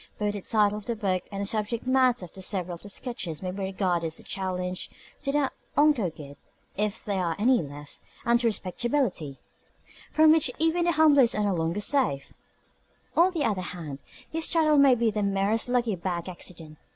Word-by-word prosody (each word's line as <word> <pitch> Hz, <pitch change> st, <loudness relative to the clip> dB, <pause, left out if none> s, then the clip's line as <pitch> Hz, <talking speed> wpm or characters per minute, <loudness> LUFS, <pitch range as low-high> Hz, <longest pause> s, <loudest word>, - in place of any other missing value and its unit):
Both 210 Hz, -1 st, -1 dB
the 205 Hz, -, -5 dB
title 210 Hz, 0 st, +2 dB
of 205 Hz, -, -14 dB
the 235 Hz, -, -1 dB
book 190 Hz, -4 st, -1 dB
and 200 Hz, 0 st, -3 dB
the -, -, -2 dB
subject 215 Hz, +3 st, -2 dB
matter 255 Hz, -5 st, +2 dB
of 185 Hz, +3 st, -9 dB
several 185 Hz, -2 st, -1 dB
of 170 Hz, -, -9 dB
the 205 Hz, -, -9 dB
sketches 190 Hz, -7 st, -4 dB
may 185 Hz, -, -2 dB
be 195 Hz, -, -7 dB
regarded 185 Hz, -3 st, -1 dB
as 160 Hz, -, -4 dB
a -, -, -14 dB
challenge 180 Hz, -1 st, -3 dB, 0.3 s
to 275 Hz, -, -2 dB
the 285 Hz, -1 st, +1 dB, 0.3 s
unco' 290 Hz, -, +4 dB
guid 145 Hz, -3 st, -11 dB, 0.4 s
(if 210 Hz, +2 st, -2 dB
there 195 Hz, -4 st, -1 dB
are 165 Hz, -2 st, -1 dB
any 245 Hz, +2 st, +3 dB
left) 145 Hz, -1 st, -10 dB, 0.3 s
and 235 Hz, +1 st, +4 dB
to 235 Hz, -, +2 dB
respectability 205 Hz, -, -1 dB, 0.7 s
(from 315 Hz, 0 st, +6 dB
which 315 Hz, -4 st, +4 dB
even 325 Hz, +2 st, +2 dB
the 345 Hz, -, +2 dB
humblest 290 Hz, -6 st, +5 dB
are 210 Hz, -, 0 dB
no 200 Hz, -1 st, +1 dB
longer 165 Hz, +3 st, -1 dB
safe). 205 Hz, -, +1 dB, 0.8 s
On 350 Hz, +3 st, +5 dB
the 330 Hz, -5 st, -1 dB
other 205 Hz, -4 st, 0 dB
hand, 160 Hz, -6 st, -6 dB, 0.3 s
his 325 Hz, 0 st, 0 dB
title 310 Hz, -3 st, +4 dB
may 275 Hz, -2 st, +6 dB
be 230 Hz, -1 st, +1 dB
the 210 Hz, 0 st, -2 dB
merest 200 Hz, +4 st, 0 dB
lucky 240 Hz, -4 st, +1 dB
bag 175 Hz, 0 st, -4 dB
accident. 165 Hz, -3 st, -7 dB
205 Hz, 195 wpm, -27 LUFS, 180-250 Hz, 0.8 s, from